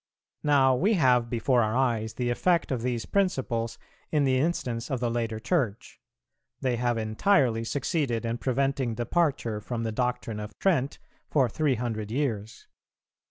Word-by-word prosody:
Now 135 -3 +4
we 195 - +2
have 125 -7 +3
before 120 +1 +2
our 110 +2 0
eyes 115 -4 0
the 120 -1 -1
effect 170 +6 +1
of 125 -3 -1
these 120 -2 -2
principles 130 - 0 0.3
in 150 -2 +2
the 130 -1 +2
instance 125 -7 -1
of 130 - -1
the 120 -1 0
later 115 -2 -2
Church; 120 - -2 0.6
they 125 -2 0
have 120 0 0
entirely 115 - +2
succeeded 130 -2 -1
in 115 +1 -2
preventing 135 -2 0
departure 120 -3 0
from 115 +1 -4
the 110 - -1
doctrine 125 -1 -2
of 105 0 -8
Trent 150 -8 +1 0.3
for 135 -4 +3
three 140 +3 +1
hundred 110 -3 -3
years. 115 -4 -3
125 Hz, 155 wpm, -27 LUFS, 115-135 Hz, 0.6 s, Now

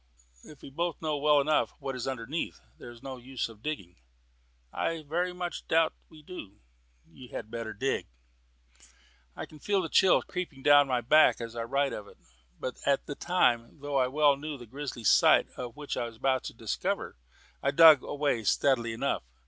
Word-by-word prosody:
"If 150 - -15
we - - -10
both 170 +4 -2
know 155 -2 -1
well 150 0 +4
enough 150 +2 +1
what 135 -1 -5
is 125 - -4
underneath, 130 +5 -4 0.2
what - - -10
is 120 -1 -13
the 135 -1 -6
use 125 +1 -4
of 110 -2 -15
digging?" 120 - -5 0.8
"I 165 -1 -2
very 175 +5 -1
much 180 -1 -6
doubt 160 0 +3
if - - -38
we 155 -1 -16
do," 145 - -10 0.5
said - - -28
he. - - -18
"You 125 -2 -11
had 110 -1 -7
better 115 -2 -4
dig." 130 +6 -2 1.3
I - - -5
can 155 - -16
feel 200 +5 +1
the 165 -4 -3
chill 190 +3 +4
creeping 165 -7 -6
down 145 -1 +6
my 125 -2 0
back 155 +6 +5
as 115 -1 -7
I 115 -1 -3
write 140 +3 0
of 105 - -7
it; - - -17 0.4
but 130 - -5
at 140 -1 +2
the - - -5
time, 140 -7 +1
though 145 0 -2
I 130 -1 +3
well 145 +1 +3
knew 150 0 -6
the 120 - -11
grisly 130 0 -7
sight - - +5 0.3
which 150 -1 -5
I - - -2
was 115 - -16 0.3
to - - -7
discover, - - -3 0.4
I 140 - +1
dug 155 -1 +8
away 140 -6 -1
steadily 120 +2 +2
enough. 115 - -1
140 Hz, 195 wpm, -29 LUFS, 120-155 Hz, 1.3 s, dug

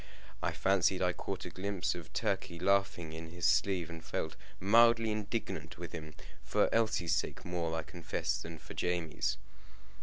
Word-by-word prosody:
I - - +1
fancied 95 -1 +3
I 90 -1 +3
caught 95 0 -4
a - - -6
glimpse 95 0 -1
of 85 -2 -8
Turkey 85 - -1
laughing 95 -3 +1
in 80 0 -7
his 90 -1 -3
sleeve, 95 -4 +3
and 80 -1 -8
felt 80 -1 -3 0.2
mildly 115 +2 +6
indignant 100 -7 -3
with 85 +1 -6
him 75 -2 -7 0.3
for - - +2
Elsie's 100 -8 +2
sake - - -2
more, 85 -2 -1
I 80 - -1
confess, 85 0 -2
than 80 0 -7
for 75 - -10
Jamie's. 85 -3 0
90 Hz, 160 wpm, -33 LUFS, 80-100 Hz, 0.3 s, mildly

